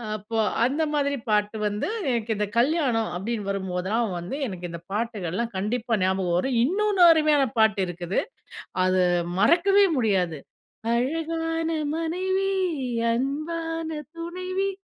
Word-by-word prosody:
அப்போ 215 +2 -5 0.3
அந்த 290 +5 0
மாதிரி 285 -1 +1
பாட்டு 210 +1 +1
வந்து 205 0 -2 0.2
எனக்கு 230 -2 -1
இந்த 210 0 0
கல்யாணம் 250 -4 +2
அப்படின்னு 205 +2 -3
வரும்போதெல்லாம் 190 +2 -1
வந்து 175 +10 -5
எனக்கு 180 -3 -6
இந்த 170 0 -7
பாட்டுகள்லாம் 215 -1 -2
கண்டிப்பா 225 +4 -1
ஞாபகம் 185 -2 +1
வரும். 245 +5 0
இன்னொன்னு 395 +5 +1
அருமையான 305 -3 +4
பாட்டு 220 -2 +4
இருக்குது, 175 +1 -2 0.6
அத 185 0 +2 0.4
மறக்கவே 385 - +5
முடியாது. 185 - +1 0.6
"அழகான 325 +5 -1 0.3
மனைவி, 375 +4 -1 0.6
அன்பான 325 +5 -2 0.3
துணைவி, 370 +3 -3
235 Hz, 115 wpm, -25 LUFS, 200-325 Hz, 0.6 s, மறக்கவே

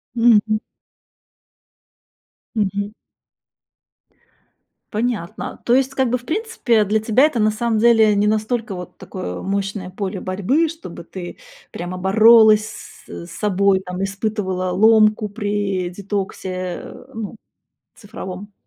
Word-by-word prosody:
Мгм. 220 -2 +4 2.0
Мгм. 205 -1 -1 2.0
Понятно. 215 -5 -3
То 240 - +4
есть 265 0 +1
как 265 -2 +1
бы, 250 - +1
в 245 - -16
принципе, 315 - +1
для 215 +2 +1
тебя 220 +4 +3
это 300 -6 0
на 215 0 +3
самом 225 +1 -1
деле 220 -2 +5
не 205 +1 +2
настолько 220 +1 0
вот 180 -1 -8
такое 185 - -6
мощное 195 -1 -3
поле 190 0 -4
борьбы, 205 - +1
чтобы 240 - -9
ты 175 +1 -8 0.3
прямо 175 +1 -5
боролась 215 +3 +6 0.4
с 170 - -9
собой 195 +1 +1
там, 180 0 -6
испытывала 195 -2 -2
ломку 215 +2 +4
при 205 -3 -2
детоксе, 195 0 -4 0.3
э, - - -11
ну, 220 -1 -6 0.6
цифровом. 205 -2 -8
210 Hz, 115 wpm, -20 LUFS, 190-225 Hz, 2.0 s, боролась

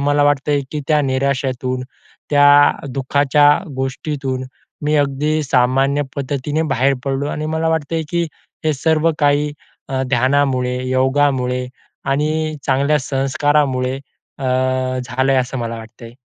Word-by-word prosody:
मला 145 +1 +2
वाटत 145 0 +1
आहे, 145 -1 +2
की 150 - -2
त्या 150 -1 +4
निराशेतून, 130 -1 -1 0.5
त्या 145 0 +6 0.2
दुःखाच्या 140 +2 +3 0.3
गोष्टीतून, 135 0 -3 0.4
मी 150 +1 +1
अगदी 145 +2 +1
सामान्य 135 +2 +2
पद्धतीने 140 +3 -2
बाहेर 135 +2 +2
पडलो 135 +1 -1
आणि 155 +1 -3
मला 160 0 0
वाटत 160 -1 -1
आहे, 165 -1 0
की 170 -1 +1 0.4
हे 155 - +2
सर्व 160 +3 +2
काही 145 0 +2 0.4
अ, 130 -1 -1
ध्यानामुळे, 130 -1 +1
योगामुळे 130 -1 +1 0.4
आणि 155 +3 0
चांगल्या 140 +2 +2
संस्कारामुळे 135 -1 0 0.4
अ, - - -8 0.6
झाल 130 +3 -1
आहे, 135 - +4
असं 130 +1 -2
मला 115 -1 -3
वाटतंय. 115 +1 -12
140 Hz, 130 wpm, -18 LUFS, 130-145 Hz, 0.6 s, त्या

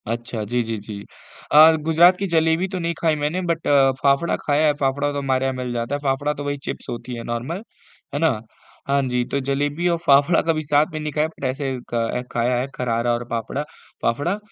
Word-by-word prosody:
अच्छा, 115 -1 -3
जी, 120 +3 -1
जी, 115 0 -3
जी। 100 0 -8 0.5
अ, 155 +2 +9
गुजरात 170 +3 +5
की 195 - -2
जलेबी 160 +1 +2
तो 190 -1 -4
नहीं 170 0 -1
खाई 160 -2 +3
मैंने 150 +5 -1
बट 165 -1 -1 0.3
फाफड़ा 140 +5 +2
खाया 150 +1 +2
है, 150 - +4
फाफड़ा 140 +1 0
तो 145 - -4
हमारे 135 -1 0
यहाँ 135 - 0
मिल 125 -1 -4
जाता 120 +4 -2
है। - - -3
फाफड़ा 140 +2 0
तो 145 - -6
वही 145 0 -2
चिप्स - - -5
होती 120 +1 -5
है 115 - -6
नॉर्मल 125 - -4 0.5
है 145 - -1
ना? 160 0 +3 0.6
हाँ 140 0 +2
जी, 125 -1 0
तो 140 - -2
जलेबी 145 +5 -1
और 170 -1 +2
फाफड़ा 145 +3 +5
कभी 160 -1 0
साथ 145 0 +3
में 155 - -3
नहीं 150 0 -3
खाया 150 +2 +1
बट 160 - -15
ऐसे 135 +2 -2
अ, 120 -1 -2
खाया 120 +1 +1
है 130 - -2
खरारा 120 -1 0
और 120 +1 -2
फाफड़ा 115 +5 -3 0.4
फाफड़ा। 145 - 0
140 Hz, 215 wpm, -22 LUFS, 125-160 Hz, 0.6 s, अ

